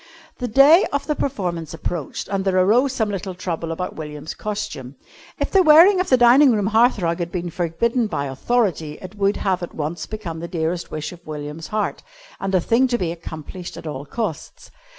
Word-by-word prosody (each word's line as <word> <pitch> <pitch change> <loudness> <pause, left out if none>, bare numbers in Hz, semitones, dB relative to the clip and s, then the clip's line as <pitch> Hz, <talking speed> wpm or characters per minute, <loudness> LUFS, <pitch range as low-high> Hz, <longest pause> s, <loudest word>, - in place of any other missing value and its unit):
The 250 - -2
day 275 - +6
of 285 0 -1
the 300 - 0
performance 180 - -3
approached, 165 -3 -4
and 195 -1 -1
there 190 -1 +1
arose 230 +9 +4
some 220 -5 -1
little 190 -1 -4
trouble 170 -2 -4
about 180 +3 -4
William's 150 -1 -7
costume. 145 -11 -5 0.4
If - - -2
the 390 - +5
wearing 345 +4 +7
of 365 - -3
the 255 - +5
dining 250 +3 +6
room 210 -3 +1
hearth 225 +4 +4
rug 170 -2 -1
had 170 0 -3
been 175 -1 -4
forbidden 215 +8 0
by 140 -9 -2
Authority 160 - -1
it 185 +1 -9
would 200 -1 +1
have 185 -2 0
at 175 - -7
once 155 +3 -4
become 190 -7 -6
the 170 - -5
dearest 170 0 -2
wish 150 -1 -5
of 175 -3 -14
William's 150 +1 -6
heart 215 -1 -2 0.4
and 195 0 -1
a - - +5
thing 235 +8 +3
to 245 -1 0
be 175 -7 -2
accomplished 170 +1 -8
at - - -9
all 145 -2 -5
costs. 205 -5 -5
185 Hz, 200 wpm, -21 LUFS, 165-235 Hz, 0.4 s, wearing